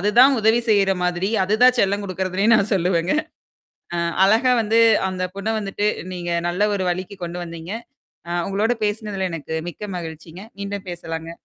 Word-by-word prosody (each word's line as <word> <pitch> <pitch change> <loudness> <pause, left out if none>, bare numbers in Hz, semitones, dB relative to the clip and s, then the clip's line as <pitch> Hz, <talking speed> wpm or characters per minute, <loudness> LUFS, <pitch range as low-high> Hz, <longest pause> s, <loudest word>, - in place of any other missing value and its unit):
அதுதான் 240 +8 +5
உதவி 220 +2 +4
செய்ற 200 -2 +4
மாதிரி. 180 +2 0
அதுதான் 245 +6 +4
செல்லம் 200 +1 +1
குடுக்குறதுனே 185 +1 -1
நான் 200 0 0
சொல்லுவேங்க. 175 -1 +1 0.8
அ - - -1 0.3
அழகா 225 +6 +4
வந்து 225 +2 +3 0.3
அந்த 185 -1 -4
பொண்ண 200 +2 -3
வந்துட்டு, 205 0 -1 0.3
நீங்க 175 -1 -4 0.2
நல்ல 205 +5 +1
ஒரு 190 - -2
வழிக்கு 185 +3 -4
கொண்டு 175 +1 -5
வந்தீங்க. 165 +2 -8 0.6
ஆ - - -6 0.2
உங்களோடு 215 +5 +1
பேசினதுல 205 -3 -2
எனக்கு 160 -1 -5 0.2
மிக்க 175 - -16 0.2
மகிழ்ச்சிங்க. 160 +1 -9 0.2
மீண்டும் 200 0 -5
பேசலாங்க. 165 -1 -6
195 Hz, 150 wpm, -21 LUFS, 175-210 Hz, 0.8 s, அதுதான்